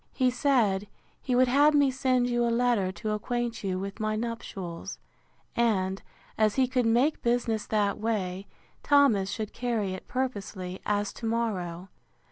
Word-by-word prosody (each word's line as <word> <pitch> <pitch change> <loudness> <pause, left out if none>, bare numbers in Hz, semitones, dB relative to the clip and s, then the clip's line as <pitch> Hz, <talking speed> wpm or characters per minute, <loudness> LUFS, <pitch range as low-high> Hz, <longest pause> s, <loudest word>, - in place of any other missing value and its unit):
He 255 -2 +2
said, 225 -7 +2 0.3
He 255 - -1
would 255 +1 +5
have 290 +4 +5
me 285 -2 +4
send 255 -2 +1
you 240 -1 +1
a 235 - +2
letter 235 -5 +2
to 215 +3 -4
acquaint 235 +2 -2
you 190 -2 -1
with 195 +3 -5
my 215 0 0
nuptials; 200 -6 -5 0.6
and, 195 -5 +1 0.4
as 215 -1 +3
he 260 -1 +3
could 250 -2 +1
make 250 +7 +2
business 235 -2 0
that 205 -2 0
way, 200 -4 -2 0.3
Thomas 275 -10 +4
should 215 0 -4
carry 225 -6 -1
it 185 - -8
purposely, 200 -7 -4
as 205 0 0
to 230 - -5
morrow. 195 -6 -2
225 Hz, 155 wpm, -28 LUFS, 195-245 Hz, 0.6 s, would